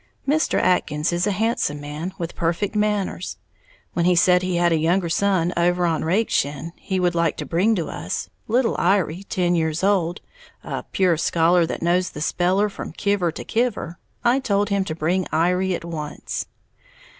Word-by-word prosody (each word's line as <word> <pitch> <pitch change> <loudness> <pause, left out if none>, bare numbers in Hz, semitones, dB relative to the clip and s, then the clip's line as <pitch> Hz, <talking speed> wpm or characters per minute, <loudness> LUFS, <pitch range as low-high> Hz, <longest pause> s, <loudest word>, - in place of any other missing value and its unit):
Mr. 310 +3 +2
Atkins 155 -3 +1
is 175 +3 +1
a - - +2
handsome 205 -7 0
man, 150 +5 -5
with 170 -1 -4
perfect 170 +5 -1
manners. 210 -3 -1 0.6
When 170 - +1
he 180 0 +4
said 180 +1 +5
he 185 -1 -1
had 175 0 +3
a 165 - +2
younger 170 +2 +1
son 180 -1 +1
over 175 +1 +2
on 165 -2 0
Rakeshin 160 -5 0
he 190 -2 -3
would 175 -1 +2
like 170 -2 +1
to - - -4
bring 200 +6 +2
us, 90 - -4 0.2
little 235 +2 +2
Iry, 185 -2 +1
ten 180 -2 0
years 160 0 0
old, 180 -4 +1 0.4
a - - -4
"pure 180 -4 +2
scholar, 170 +1 +3
that - - -4
knows 180 +2 +2
the - - -9
speller 185 +6 +2
from 195 - -7
kiver 200 -3 0
to - - -7
kiver," 220 -8 -2 0.2
I 245 +2 +3
told 205 -5 0
him 200 -1 +1
to 155 - -4
bring 175 +4 0
Iry 180 +3 +1
at 170 - -7
once. 155 -3 -5
175 Hz, 175 wpm, -22 LUFS, 165-195 Hz, 0.6 s, said